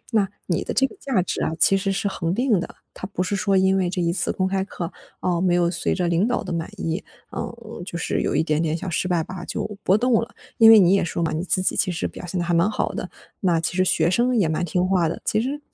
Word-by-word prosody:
那 200 -3 +3 0.2
你 170 - -1
的 - - -4
这 265 +5 +4
个 - - -6
价 240 -10 0
值 - - -3
啊 - - 0
其 195 - +5
实 195 0 0
是 195 +1 -1
恒 180 -3 -2
定 240 -4 +2
的， - - -6 0.2
它 190 - -7
不 185 -2 -2
是 200 - -2
说 195 0 +1
因 190 0 +3
为 185 -2 +1
这 180 0 -3
一 170 -1 +1
次 180 0 0
公 185 - 0
开 190 0 0
课， 180 -3 -6 0.3
啊， 175 -2 0
没 180 -1 +2
有 175 -1 +2
随 170 -1 0
着 180 -2 0
领 170 +5 +2
导 245 -3 -1
的 185 - -5
满 165 -1 -3
意， 165 +4 -2 0.3
嗯， 230 -5 -7
就 175 -1 -6
是 - - -1
有 - - -1
一 - - +3
点 155 0 0
点 160 0 0
小 185 - -6
失 175 +2 -1
败 175 -3 +1
吧 180 0 -8
就 215 - -3 0.2
波 190 - +4
动 250 +3 +1
了。 230 - -8 0.2
因 225 -1 +9
为 225 - +10
你 185 -2 +5
也 195 - +3
说 170 0 -2
嘛， 160 - 0
你 160 +3 -2
自 185 0 +2
己 - - +1
其 185 - +1
实 165 - -2
表 - - -10
现 180 +2 -4
得 175 - -1
还 175 - 0
蛮 170 +4 +3
好 215 - -1
的， - - -5 0.3
那 175 -5 +2
其 165 +2 -2
实 185 - +3
学 165 -3 +2
生 245 +6 +2
也 190 - +3
蛮 160 +2 -1
听 180 +2 0
话 180 -4 +2
的， - - -5
其 215 - +1
实， 275 +5 -3
185 Hz, 310 characters per minute, -23 LUFS, 170-200 Hz, 0.3 s, 为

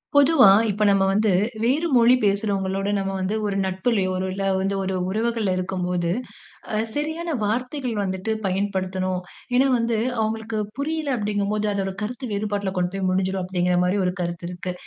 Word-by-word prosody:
பொதுவா 285 -4 +7 0.2
இப்ப 210 +1 0
நம்ம 195 -1 +4
வந்து, 210 +2 +2 0.3
வேறு 285 +8 +2
மொழி 240 +1 +6
பேசுகிறவங்களோட 200 -1 0
நம்ம 195 0 -1
வந்து 190 +3 -1
ஒரு 200 -1 -1
நட்புலயோ, 190 +1 0 0.2
இல்ல 195 +1 -3 0.2
வந்து 195 +1 0
ஒரு 190 0 -2
உறவுகள்ல 220 -1 0
இருக்கம்போது, 180 -2 -1 0.7
அ - - +1 0.2
சரியான 315 +2 -2
வார்த்தைகள் 250 +3 -2
வந்துட்டு 190 +2 -2
பயன்படுத்தணும். 185 -1 -1 0.4
ஏன்னா 270 +2 +4
வந்து 230 -1 0 0.2
அவங்களுக்கு 220 0 -2 0.2
புரியல 300 -1 -1
அப்படீங்கும்போது 210 0 -1
அதோரு 195 -1 -1
கருத்து 245 +3 -4
வேறுபாட்டுல 205 -1 -2
கொண்டு 180 0 0
போய் 190 -1 0
முடிஞ்சிரும், 190 0 0
அப்பிடீங்கிற 180 -1 0
மாரி 185 +3 +1
ஒரு 180 - -1
கருத்து 170 0 -4
இருக்கு. 180 0 -5
200 Hz, 150 wpm, -23 LUFS, 190-230 Hz, 0.7 s, பொதுவா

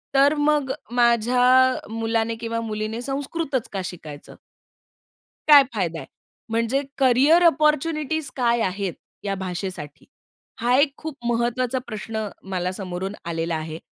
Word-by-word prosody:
तर 280 +2 +5
मग 295 -2 +2 0.3
माझ्या 250 +2 +4
मुलाने 225 0 -1
किंवा 230 0 -3
मुलीने 215 +1 -4
संस्कृतच 275 0 -3
का 195 - -2
शिकायचं? 155 -5 -9 1.1
काय 290 -2 +9
फायदा 170 -6 -2
आहे? 135 - -9 0.4
म्हणजे 230 +4 +1 0.2
करियर 275 +6 +5
अपॉर्च्युनिटीज 305 -1 +1
काय 235 -2 +2
आहेत, 190 -2 -1 0.3
या 200 -1 -1
भाषेसाठी? 180 -5 -6 0.6
हा 245 +2 +2
एक 280 0 +3
खूप 315 -3 -6
महत्वाचा 240 +2 0
प्रश्न 220 -1 -4 0.2
मला 180 0 -1
समोरून 190 +1 -5
आलेला 165 0 -2
आहे. 155 +1 -5
235 Hz, 120 wpm, -23 LUFS, 195-270 Hz, 1.1 s, काय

